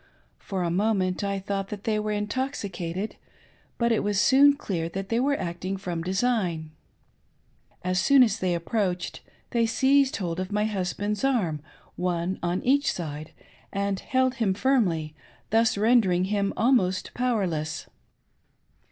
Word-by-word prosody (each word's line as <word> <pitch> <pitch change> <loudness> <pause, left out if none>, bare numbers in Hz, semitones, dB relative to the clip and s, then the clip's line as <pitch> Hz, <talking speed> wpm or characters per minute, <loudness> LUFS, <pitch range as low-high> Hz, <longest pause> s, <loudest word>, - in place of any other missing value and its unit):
For 190 -2 -3
a 170 - 0
moment 190 -1 +1
I 200 0 -1
thought, 195 0 -3
that 205 -1 -7
they 215 -1 0
were 210 0 -2
intoxicated, 210 -4 -3 0.6
but 235 0 +2
it 225 - +2
was 205 -1 +1
soon 280 +4 +6
clear 170 - -3
that 195 +2 -5
they 230 - +1
were 280 +2 +2
acting 175 +3 -3
from 175 -3 -4
design. 185 -4 -1 1.1
As 185 0 +1
soon 275 -2 +6
as 225 -2 +1
they 180 -2 0
approached, 180 0 -2 0.3
they 230 -1 +2
seized 265 +4 +3
hold 175 -3 -3
of 185 +2 -4
my 210 +1 +1
husband's 205 +1 -2
arms, 195 - +1 0.4
one 180 +1 -1
on 175 +1 -1
each 280 +3 +3
side, 155 -2 -6 0.4
and 200 -1 -1
held 260 -1 +1
him 195 -4 +2
firmly, 185 - +1 0.4
thus 225 -1 +3
rendering 205 -5 +3
him 200 -1 +1
almost 195 -7 +2
pov/erless. 185 -11 -1
200 Hz, 145 wpm, -26 LUFS, 180-230 Hz, 1.1 s, soon